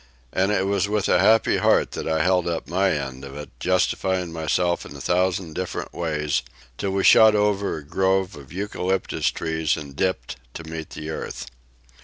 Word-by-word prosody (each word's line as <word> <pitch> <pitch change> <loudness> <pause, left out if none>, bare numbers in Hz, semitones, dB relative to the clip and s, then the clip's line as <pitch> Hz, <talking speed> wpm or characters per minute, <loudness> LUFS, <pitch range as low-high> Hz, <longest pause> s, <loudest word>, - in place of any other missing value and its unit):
And 95 +2 +2
it 95 -2 +1
was 100 0 +1
with 105 -2 0
a - - +4
happy 110 +1 +4
heart - - +3
that - - -5
I 80 -1 +1
held 90 -1 +2
up 85 -1 -2
my 95 +3 +2
end 70 -5 -3
of 70 +1 -8
it, 75 - -8
justifying 95 -1 0
myself 85 +2 0
in - - -10
a - - -9
thousand 90 -2 0
different 90 +2 -4
ways, 75 -5 -1 0.4
till 100 - -1
we 95 0 0
shot 110 -1 +7
over 105 -3 +1
a 75 - -9
grove 95 +3 +1
of 70 -3 -13
eucalyptus 95 -1 -1
trees 80 -1 -1
and 70 -3 -8
dipped 70 -9 -1 0.2
to 85 - -6
meet 80 0 -7
the 75 +1 -6
earth. 65 -4 -5
90 Hz, 185 wpm, -23 LUFS, 80-95 Hz, 0.4 s, shot